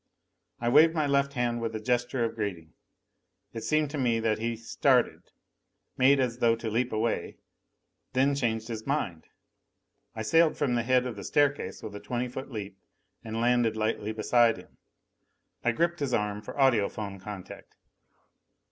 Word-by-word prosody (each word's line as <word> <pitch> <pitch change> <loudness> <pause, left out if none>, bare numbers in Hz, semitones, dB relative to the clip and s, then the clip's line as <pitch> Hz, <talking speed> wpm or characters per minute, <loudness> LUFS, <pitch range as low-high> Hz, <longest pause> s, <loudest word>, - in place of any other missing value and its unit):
I 120 - -2
waved 155 +6 +6
my 155 -2 +1
left 140 0 +1
hand 120 -2 -1
with 115 -1 -3
a - - -2
gesture 120 +2 0
of 115 - -3
greeting. 95 -8 -5 0.8
It 115 - -5
seemed 155 -1 +1
to 150 - -3
me 120 -3 +2
that 110 -1 0
he 115 +1 -2
started, 115 +1 +1 0.7
made 135 +2 +5
as 125 -2 -1
though 115 -1 +4
to 115 -1 -5
leap 120 +3 0
away, 110 +1 0
and - - -12 0.8
then 135 +2 +3
changed 115 -4 -1
his 110 -1 -6
mind. 90 - -2 0.9
I 110 - -3
sailed 165 +7 +3
from 140 -4 0
the 120 - +2
head 125 +2 +2
of 120 -4 -5
the 100 - -7
staircase 145 -1 0
with 100 - -7
a - - -6
twenty 125 +2 -3
foot 130 +3 -7
leap 100 -5 -7 0.4
and 110 0 -4
landed 120 -2 +2
lightly 110 -1 -1
beside 115 +1 +3
him. - - -16 0.8
I 120 - +3
gripped 170 +7 0
his 135 -4 0
arm 105 -1 -2
for - - -9
audiphone 105 -6 +1
contact. 100 -2 -9
120 Hz, 170 wpm, -28 LUFS, 110-130 Hz, 0.9 s, waved